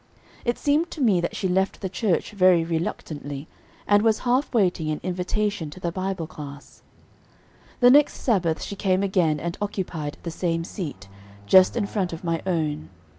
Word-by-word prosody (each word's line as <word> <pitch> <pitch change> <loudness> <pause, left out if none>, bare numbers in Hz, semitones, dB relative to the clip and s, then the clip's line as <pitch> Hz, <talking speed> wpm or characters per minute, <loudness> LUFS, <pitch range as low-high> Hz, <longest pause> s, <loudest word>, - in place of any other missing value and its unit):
It 240 0 0
seemed 300 +4 +1
to 320 - -9
me 210 -10 +3
that 175 - -3
she 190 - -1
left 190 +2 0
the 195 - -2
church 190 0 -1
very 185 -4 +4
reluctantly, 155 -3 -4 0.4
and 205 0 +4
was 220 -1 +3
half 255 +4 +2
waiting 180 -8 +1
an 155 - -2
invitation 185 -1 -2
to 165 - -11
the 175 -2 -2
Bible 185 -1 -3
class. 140 -2 -10 1.0
The 245 0 +8
next 290 +2 +5
Sabbath 180 -9 0
she 200 - -5
came 190 -1 +1
again 175 -6 +2
and 170 +3 -4
occupied 175 -7 -3
the 170 - -4
same 165 0 -1
seat, 150 - -6 0.4
just 185 - +6
in 215 - +1
front 190 -4 -2
of 165 - -7
my 165 -1 -1
own. 155 -4 -1
180 Hz, 175 wpm, -24 LUFS, 165-205 Hz, 1.0 s, The